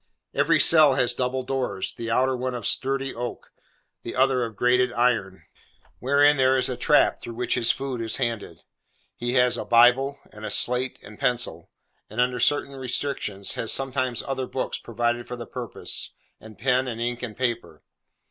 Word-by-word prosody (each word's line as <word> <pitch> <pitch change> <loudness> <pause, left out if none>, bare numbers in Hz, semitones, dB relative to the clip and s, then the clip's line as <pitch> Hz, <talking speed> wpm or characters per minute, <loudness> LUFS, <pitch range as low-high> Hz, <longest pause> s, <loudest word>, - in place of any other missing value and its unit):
Every - - +3
cell 155 -4 +7
has 120 - +3
double 130 +1 -2
doors: 130 -7 -2
the 115 -1 -6
outer 130 +3 +2
one 125 0 -3
of 120 -4 -6
sturdy 135 0 -1
oak, 120 +1 -6 0.5
the - - -7
other 130 -1 +2
of 115 -2 -5
grated 125 +3 +2
iron, 115 -6 0 0.6
wherein 145 +2 +4
there 130 0 +3
is 130 - +1
a 125 - -2
trap - - +3
through 115 - -8
which 125 +1 -1
his 115 - +2
food 135 -3 -1
is 110 -1 0
handed. 115 -4 -4 0.5
He 120 +1 -3
has 125 -1 +3
a - - -3
Bible, 125 +4 +4
and 105 0 -12
a - - -3
slate 125 +1 +1
and 105 +1 -13
pencil, 120 -11 -1 0.4
and, 110 - -7
under 125 0 +1
certain 140 +2 +1
restrictions, 125 -6 -3
has 115 - -2
sometimes 130 -3 -1
other 130 -1 -3
books, 130 - -3
provided 120 +1 -2
for 125 - -5
the 120 -1 -8
purpose, - - -5 0.3
and 110 -1 -14
pen 130 0 +1
and 115 -2 -5
ink 120 +1 -3
and 115 -4 -6
paper. 120 - -3
125 Hz, 175 wpm, -24 LUFS, 115-130 Hz, 0.6 s, cell